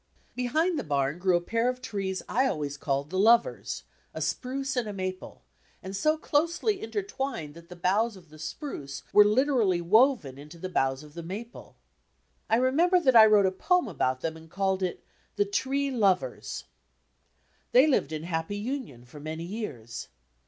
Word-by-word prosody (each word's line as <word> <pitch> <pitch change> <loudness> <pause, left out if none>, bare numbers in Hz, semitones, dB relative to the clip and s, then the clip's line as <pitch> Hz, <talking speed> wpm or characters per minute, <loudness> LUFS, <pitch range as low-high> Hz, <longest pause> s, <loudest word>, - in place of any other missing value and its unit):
Behind 310 +7 +1
the - - -3
bam 140 +1 -1
grew 180 -1 +3
a - - -3
pair 230 +7 0
of 250 0 -3
trees 195 -6 -3
I 260 +4 +2
always 145 - -2
called 140 0 -2
"The 185 - -1
Lovers," 230 +3 +3 0.3
a - - -4
spruce 270 +1 -2
and 245 -3 0
a 210 - -4
maple, 185 -1 -6 0.4
and 190 +1 -6
so 310 +10 +2
closely 340 +7 0
intertwined 275 - -4
that 170 +1 -14
the 180 - -9
boughs 200 +5 +1
of 170 -4 -17
the 155 0 -15
spruce 150 - -6
were 210 - +9
literally 215 -4 +2
woven 195 - +3
into 150 +4 -11
the 185 +2 -5
boughs 135 -4 0
of 150 -1 -14
the 170 - -6
maple. 205 +8 -8 0.7
I 225 - +4
remember 310 +10 +3
that 260 -7 +3
I 220 -1 +10
wrote 210 -2 +5
a 190 - +2
poem 360 - +1
about 130 0 -1
them 160 -1 -2
and 160 0 -13
called 190 +1 0
it 185 -1 -3 0.3
"The 410 - +2
Tree 280 -8 -1
Lovers." 200 -7 0 1.1
They 255 +3 +7
lived 260 - +1
in 155 0 -4
happy 165 +3 -3
union 215 - -5
for 135 +4 -12
many 155 +2 -5
years. 170 - -6
200 Hz, 175 wpm, -28 LUFS, 160-260 Hz, 1.1 s, I